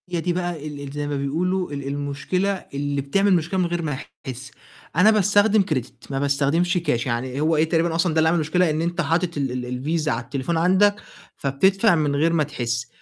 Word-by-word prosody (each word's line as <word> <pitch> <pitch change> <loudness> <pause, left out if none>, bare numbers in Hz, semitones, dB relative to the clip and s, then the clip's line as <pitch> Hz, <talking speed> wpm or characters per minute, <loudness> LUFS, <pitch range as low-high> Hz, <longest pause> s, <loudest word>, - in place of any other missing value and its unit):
هي 175 -2 -2
دي 175 +1 0
بقى 175 -4 -3
ال 145 -1 -7
ال 140 -1 -7
زَي 145 0 -4
ما 145 - -2
بيقولوا 175 +6 -1
ال 140 -1 -5
المشكلة 145 +7 -1 0.2
اللي 140 0 -2
بتعمل 195 +8 +2
مشكلة 175 +2 0
من 180 - +2
غير 175 0 -2
ما 150 -5 -2 0.3
تحسّ. 130 -1 -7 0.4
أنا 195 +6 +6
باستخدم 205 0 +4
credit 140 -5 -5
ما 135 - -1
باستخدمش 145 +6 +1
كاش، 150 -9 0
يعني 125 +2 -2
هو 160 +1 +2
إيه، 155 +1 +2
تقريبًا 165 0 +1
أصلًا 165 0 +1
ده 160 - +2
اللي 160 0 +4
عمل 170 - +2
المشكلة 170 +2 +2
إن 155 +1 -1
أنت 175 +1 -1
حاطط 170 +2 0
ال 135 -3 -1
ال 125 +6 -2
الڤيزا 155 - -3
على 115 -4 0
التليفون 130 +6 -2
عندك 190 +4 +4 0.4
فبتدفع 190 +9 +3
من 150 -3 0
غير 165 +4 +2
ما 160 -2 +3
تحسّ، 120 -5 -3
155 Hz, 210 wpm, -23 LUFS, 140-175 Hz, 0.4 s, أنا